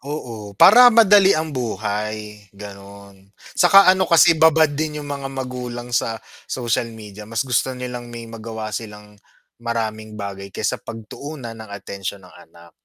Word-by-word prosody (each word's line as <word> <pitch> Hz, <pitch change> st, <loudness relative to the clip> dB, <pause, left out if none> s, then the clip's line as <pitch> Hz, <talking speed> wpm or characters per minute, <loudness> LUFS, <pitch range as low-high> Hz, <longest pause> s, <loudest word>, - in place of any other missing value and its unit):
Oo, 115 Hz, -8 st, -7 dB
para 245 Hz, -, +8 dB
madali 205 Hz, -5 st, +6 dB
ang 155 Hz, 0 st, -3 dB
buhay, 105 Hz, -3 st, -4 dB
ganun. 100 Hz, 0 st, -13 dB
Saka 195 Hz, +2 st, +4 dB
ano 190 Hz, -1 st, 0 dB
kasi 170 Hz, 0 st, +6 dB
babad 160 Hz, -1 st, +4 dB
din 150 Hz, 0 st, -4 dB
yung 145 Hz, -, -9 dB
mga 140 Hz, -1 st, -5 dB
magulang 125 Hz, -2 st, -6 dB
sa 115 Hz, -1 st, 0 dB, 0.3 s
social 120 Hz, -2 st, -2 dB
media, 105 Hz, -2 st, -11 dB
mas 115 Hz, 0 st, -2 dB
gusto 130 Hz, 0 st, -1 dB
nilang 125 Hz, -1 st, -7 dB
may 120 Hz, -1 st, -9 dB
magawa 110 Hz, -1 st, -7 dB
silang 105 Hz, -1 st, -8 dB, 0.4 s
maraming 110 Hz, -2 st, -4 dB
bagay 100 Hz, -2 st, -8 dB
kaysa -, -, -2 dB
pagtuunan 120 Hz, +4 st, -9 dB
ng 110 Hz, -1 st, -11 dB
atensyon 100 Hz, -1 st, -7 dB
ang 90 Hz, -, -16 dB
anak. 85 Hz, 0 st, -18 dB
115 Hz, 145 wpm, -20 LUFS, 105-140 Hz, 0.4 s, para